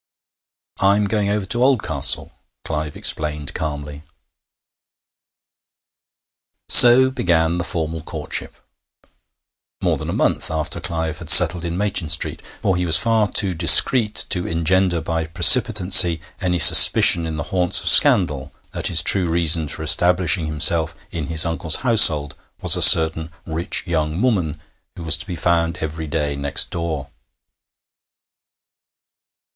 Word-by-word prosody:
'I 100 +1 0
am 105 0 -3
going 100 -1 -5
over 105 -1 -5
to 120 +5 -3
Oldcastle,' 130 -3 -2 0.3
Clive 75 -1 -7
explained 75 -2 -2
calmly. 75 -1 -9 2.7
So 130 +2 +6
began 85 -8 -3
the - - -5
formal 80 -2 -7
courtship - - -7 1.2
more - - -4
than - - -10
a - - -6
month - - -4
after 80 +2 -5
Clive 80 -3 -7
had 85 - -12
settled 90 -1 +7
in 85 0 -7
Machin 95 -5 -4
Street, 80 - -4 0.2
for 95 - -2
he 90 - -5
was 80 -3 +3
far 110 +1 -2
too 95 -3 -1
discreet 105 +6 +4
to 90 -3 -3
engender 85 +1 -3
by 80 0 -7
precipitancy 90 -1 +4 0.2
any 90 -2 -4
suspicion 85 0 +6
in 80 -1 -8
the - - -7
haunts 90 -2 +1
of - - -6
scandal 75 -6 +3 0.2
that - - -4
his - - 0
true 90 -3 +1
reason 80 -1 +1
for 80 - -8
establishing 85 +1 -1
himself 80 +2 0 0.2
in 80 -4 -8
his 80 +1 +3
uncle's 80 -1 -2
household 80 - +2 0.3
was - - +2
a - - -6
certain 80 0 +4 0.2
rich 85 +3 -4
young 80 -2 -5
woman 100 -11 -4 0.4
who 85 - -12
was 80 0 0
to - - -11
be 90 - -8
found 85 0 -4
every 80 0 -9
day 75 0 -6
next 70 0 0
door. 80 -5 -8
85 Hz, 140 wpm, -16 LUFS, 80-95 Hz, 2.7 s, settled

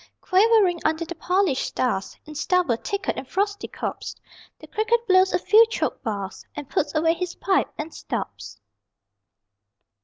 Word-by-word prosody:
Quavering 390 -2 +4
under 315 +2 0
the 345 - -6
polished 360 -4 +1
stars 240 -7 -2
In 305 - -10
stubble, 320 -3 +1
thicket, 395 - -3
and 265 - -6
frosty 405 +4 -1
copse - - -5 0.4
The - - -13
cricket 460 +2 0
blows 375 -1 +4
a - - +2
few 425 +5 +6
choked 455 - -2
bars, 200 -3 -4
And 295 -2 -6
puts 290 +3 -1
away 325 +1 +3
his 360 0 -4
pipe 385 -1 +1
and 310 +2 -5
stops. - - -6
360 Hz, 150 wpm, -24 LUFS, 295-400 Hz, 0.4 s, few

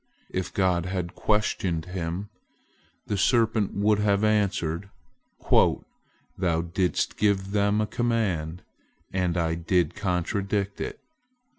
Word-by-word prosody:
If 90 -2 -2
God 90 -2 +1
had 90 -1 -3
questioned 95 -7 0
him, 90 +2 -4 0.8
the 105 - -2
serpent 110 -2 +2
would 105 +1 +3
have 105 0 +2
answered: 100 -4 +1 0.6
"Thou 85 -3 0
didst 90 -1 0
give 100 -2 +1
them 100 0 +2
a 110 - +2
command, 100 -8 -1 0.5
and 90 -2 0
I 80 -1 +1
did 85 0 +1
contradict 100 +2 -1
it. - - -4
95 Hz, 110 wpm, -26 LUFS, 90-105 Hz, 0.8 s, would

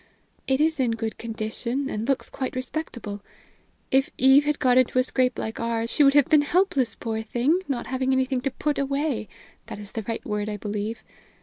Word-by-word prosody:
It 265 0 +2
is 315 -1 +2
in 245 -3 +2
good 225 -1 -4
condition, 230 +4 -3
and 220 -3 -3
looks 270 - 0
quite 260 -2 -4
respectable. 250 -6 -5 0.7
If 270 +1 +3
Eve 265 +2 +6
had 295 0 +1
got 255 -2 +4
into 255 0 +1
a 255 - +5
scrape 255 -1 +1
like 220 - -4
ours, 230 0 -1
she 295 - +4
would 275 0 +5
have 290 -3 +6
been 305 -1 +5
helpless, 290 - +1
poor 220 -1 -3
thing, 245 +10 +1
not 270 -4 -2
having 260 0 -1
anything 260 -1 +1
to 275 - 0
put 295 +3 -2
away 275 - -1 0.4
that - - -7
is 205 -1 -9
the 225 - -3
right 230 - -3
word, 210 -1 -2
I 210 - -3
believe. 210 +2 -4
255 Hz, 200 wpm, -25 LUFS, 225-275 Hz, 0.7 s, Eve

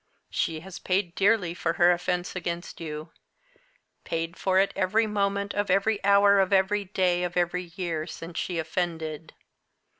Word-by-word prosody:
She 160 -1 -1
has 190 +1 -9
paid 185 -2 0
dearly 195 -3 +2
for 165 -1 -1
her 175 +1 +5
offence 180 +1 -1
against 170 -1 -5
you 155 0 -6 0.9
paid 165 +1 -3
for 190 0 +1
it 195 +1 +3
every 200 +4 +2
moment 200 -1 -1
of 205 -1 -1
every 200 +3 +2
hour 200 0 +5
of 190 0 +2
every 200 +1 +2
day 180 -2 +1
of 175 0 -3
every 175 0 -1
year 170 -4 -3
since 165 0 -6
she 180 - -3
offended. 160 -1 -3
180 Hz, 155 wpm, -27 LUFS, 170-200 Hz, 0.9 s, her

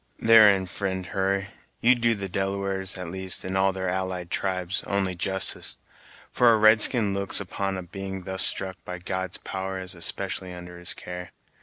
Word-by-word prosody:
"Therein, 105 -4 +6
fri'nd 95 0 -4
Hurry, 100 +1 -1 0.3
you 120 +2 +5
do 115 -2 +1
the 100 -1 -4
Delawares, 95 0 -2
at 90 -2 -7
least, 95 0 +4
and 95 +1 -4
all 95 0 +2
their 95 0 -4
allied 90 -1 -3
tribes, 95 -1 -2
only 100 -2 -1
justice, 95 +2 -2 0.5
for 120 -1 +4
a - - +3
red 110 0 +5
skin 105 -6 +4
looks 100 0 0
upon 95 0 -3
a 95 - -6
being 95 +1 -7
thus 95 +1 +5
struck 95 -1 0
by 90 - -7
God's 95 0 -4
power 95 0 -5
as 95 0 0
especially 95 +1 -1
under 90 0 -10
his 90 - -2
care. 90 0 -9
95 Hz, 175 wpm, -25 LUFS, 90-100 Hz, 0.5 s, Therein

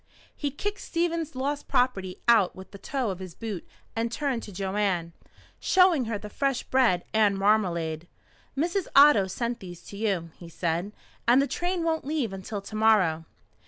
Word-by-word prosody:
He 290 - -2
kicked 405 +9 -4
Stevens' 335 -3 -2
lost 285 +3 -2
property 245 -8 0
out 220 -6 +5
with 190 0 -11
the 200 - -11
toe 250 0 -2
of 185 - -6
his 185 -3 -8
boot 215 -6 -6 0.3
and 230 0 -1
turned 265 -2 -1
to 210 - -9
Joanne, 190 -3 -1 0.5
showing 365 -8 +4
her 225 -2 -2
the 210 - -8
fresh 270 +4 -1
bread 240 -10 +2
and 210 -2 +3
marmalade. 175 -6 +1 0.5
"Mrs. 345 +6 0
Otto 275 -9 +7
sent 235 +4 -3
these 175 -2 -10
to 200 - -10
you," 195 -6 -1
he 170 - -10
said. 170 +3 -2 0.4
"And 245 +3 +6
the 275 - +3
train 350 +3 -2
won't 320 -1 0
leave 275 -8 -2
until 195 +2 -5
to 205 +2 -9
morrow." 195 -8 +3
220 Hz, 170 wpm, -27 LUFS, 190-275 Hz, 0.5 s, Otto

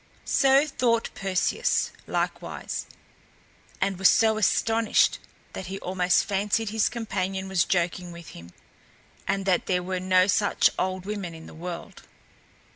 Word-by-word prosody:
So 270 +1 +4
thought 240 -5 0
Perseus, 190 -2 0 0.2
likewise, - - -3 0.9
and 195 -1 -1
was 195 - +6
so 220 -1 +3
astonished 225 +1 +2 0.3
that 185 - -6
he 195 +1 -5
almost 180 -1 +1
fancied 205 +2 0
his 220 0 +1
companion 195 -4 -3
was 190 -3 +2
joking 175 0 -1
with 170 -1 -11
him, 85 0 -12 0.8
and 195 -1 -1
that 185 -2 +1
there 180 -1 +1
were 185 0 -2
no 185 0 +4
such 205 +1 +3
old 185 0 -2
women 200 -5 -5
in 160 - -11
the - - -12
world. 170 +1 -7
190 Hz, 135 wpm, -26 LUFS, 180-215 Hz, 0.9 s, was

